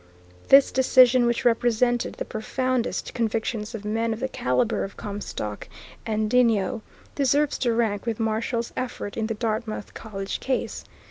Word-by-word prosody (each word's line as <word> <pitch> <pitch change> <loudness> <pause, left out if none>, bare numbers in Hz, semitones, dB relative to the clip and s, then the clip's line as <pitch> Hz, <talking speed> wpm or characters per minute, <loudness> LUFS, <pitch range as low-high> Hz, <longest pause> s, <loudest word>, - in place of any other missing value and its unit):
This 275 0 +7
decision, 255 -1 +5
which 235 0 -1
represented 240 0 +2
the - - -4
profoundest 255 +3 -2
convictions 225 -1 -2
of 210 -2 -7
men 225 +2 0
of 220 - -6
the 265 - -1
calibre 215 - 0
of 195 - -7
Comstock 200 - -5 0.4
and 215 -1 0
Denio, 230 -1 +2 0.3
deserves 285 +1 +1
to 240 -3 +1
rank 225 -2 0
with 230 -1 -2
Marshall's 230 +1 -1
effort 235 -5 -4
in 220 -1 -1
the 225 - -2
Dartmouth 220 -1 -3
College 195 -3 -5
Case. 265 -1 -2
230 Hz, 145 wpm, -25 LUFS, 215-245 Hz, 0.4 s, This